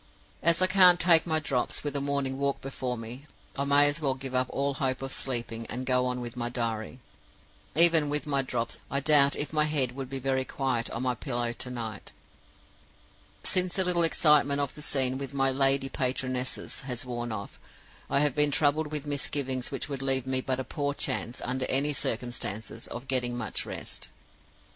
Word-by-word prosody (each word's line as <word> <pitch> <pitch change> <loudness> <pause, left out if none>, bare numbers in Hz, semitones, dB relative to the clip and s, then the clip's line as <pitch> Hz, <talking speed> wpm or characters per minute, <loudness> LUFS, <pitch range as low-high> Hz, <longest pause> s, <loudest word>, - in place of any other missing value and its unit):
As 170 +2 +4
I - - +6
can't 185 -2 +6
take 170 -1 +5
my 160 -1 +2
drops, 135 -5 -1
with 145 -1 -3
a 140 - 0
morning 140 -1 -1
walk 140 0 -1
before 130 -2 -4
me, 120 +5 -8 0.3
I 140 - -1
may 145 +1 +5
as 145 +3 0
well 135 -3 +1
give 135 -1 -7
up 130 0 +1
all 140 0 -1
hope 135 -1 -1
of 135 - -4
sleeping, 115 -3 -2
and 130 +2 -4
go 125 0 +2
on 125 0 -2
with 120 0 -6
my 120 -1 -2
diary. 115 0 -4 0.7
Even 165 -2 +6
with 150 0 0
my 140 -2 +2
drops, 120 -3 -4
I 140 - 0
doubt 140 -1 +5
if 145 - -2
my 150 -1 +3
head 145 -5 0
would 130 0 -7
be 135 - -4
very 130 0 0
quiet 130 -3 -2
on - - -4
my 125 -1 +1
pillow 120 -1 -3
to 125 - -3
night. 115 -4 -6 1.3
Since 185 -1 +1
the 190 - +2
little 180 -1 +1
excitement 150 -3 +4
of 140 -2 -2
the 150 - -11
scene 130 -3 +2
with 140 0 -6
my 135 -1 +3
'lady 135 0 +3
patronesses' 130 -1 -2
has 125 -2 -3
worn 120 -1 -4
off, 100 -2 -7 0.5
I 140 - +2
have 150 -1 +2
been 150 0 +3
troubled 150 +2 +2
with 150 -1 -3
misgivings 140 -3 -1
which 135 - -4
would 140 -2 -5
leave 135 -2 +1
me 130 0 0
but 130 0 -2
a - - -2
poor 145 +1 -3
chance, 120 - -3
under 130 +1 -1
any 145 +3 +2
circumstances, 115 -3 -2
of 120 +2 -8
getting 125 -2 -1
much 120 -3 -4
rest. - - -4
135 Hz, 195 wpm, -28 LUFS, 125-145 Hz, 1.3 s, I